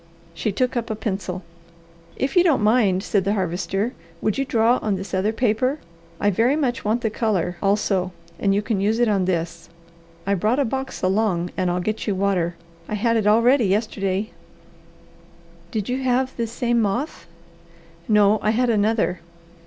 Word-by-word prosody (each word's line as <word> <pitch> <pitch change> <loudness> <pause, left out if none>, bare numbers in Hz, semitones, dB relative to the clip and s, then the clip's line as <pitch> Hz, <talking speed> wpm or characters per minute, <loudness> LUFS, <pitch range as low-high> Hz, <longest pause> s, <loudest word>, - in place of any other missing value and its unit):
She 170 +6 -2
took 250 +5 0
up 235 -1 -2
a 220 - -1
pencil. 195 -3 -4 0.7
"If 270 +1 -2
you 355 - +6
don't 315 -11 +3
mind," 210 -4 +3
said 200 -3 +1
the 200 +3 0
Harvester, 195 +4 -1 0.3
"would 215 - 0
you 275 - 0
draw 235 -1 +3
on 210 -2 0
this 190 +1 -7
other 190 +3 +1
paper? 245 +4 +1 0.4
I 205 - +2
very 230 +8 +2
much 265 -6 -1
want 220 +3 0
the 220 -3 -1
colour, 190 -6 -1
also, 195 -2 +1 0.3
and 200 - +2
you 205 - 0
can 210 -3 -1
use 215 +3 +1
it 240 0 +3
on 200 -3 +2
this. 170 -2 -3 0.6
I 200 - +1
brought 215 +6 +1
a 285 - +2
box 265 +3 -4
along, 185 -2 +1
and 185 -2 0
I'll 175 +1 0
get 215 +5 -3
you 205 - +1
water. 185 -3 0 0.3
I 215 - -1
had 230 +2 +1
it 215 -2 +1
all 220 +2 +5
ready 250 -1 +4
yesterday." 200 0 -1 1.4
"Did 215 -4 -3
you 255 +2 -2
have 260 0 0
this 230 -1 -3
same 240 -1 +1
moth?" 235 +9 -2 0.8
"No, 210 -1 +4
I 215 - +1
had 240 +2 +2
another." 210 -4 +1
215 Hz, 180 wpm, -22 LUFS, 195-235 Hz, 1.4 s, you